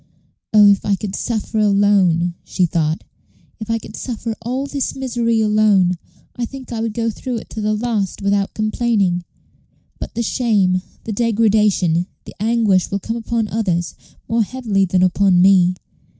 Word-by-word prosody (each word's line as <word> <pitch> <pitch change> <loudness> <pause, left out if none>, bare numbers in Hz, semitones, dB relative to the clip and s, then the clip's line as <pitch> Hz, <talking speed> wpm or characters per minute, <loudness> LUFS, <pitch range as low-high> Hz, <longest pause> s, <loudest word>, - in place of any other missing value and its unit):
"Oh, 210 -1 +7
if 200 - +1
I 200 - +1
could 195 0 -5
suffer 220 -1 -2
alone," 195 -4 +3
she 185 - 0
thought 160 -2 -1 0.6
"if 220 0 -7
I 230 - +1
could - - -10
suffer 230 -2 -4
all 255 +4 -3
this 280 -1 -3
misery 235 -3 0
alone, 210 -4 +3 0.4
I 245 - -3
think 260 +2 -7
I 230 - -3
would 225 -2 -3
go 230 -1 0
through 250 +3 -5
it - - -10
to 220 - -5
the 215 0 0
last 210 -3 -2
without 200 0 0
complaining; 215 -5 0 0.8
but - - -7
the 235 - -1
shame, 205 -6 +1 0.2
the 220 - -4
degradation, 210 -6 +2 0.2
the - - -10
anguish 215 -4 +2
will 200 - -1
come 225 +3 -4
upon 230 -1 -2
others 180 -6 -1 0.3
more 230 0 +1
heavily 215 -4 0
than 185 0 +1
upon 185 0 +3
me. 180 -1 +5
210 Hz, 165 wpm, -19 LUFS, 190-230 Hz, 0.8 s, Oh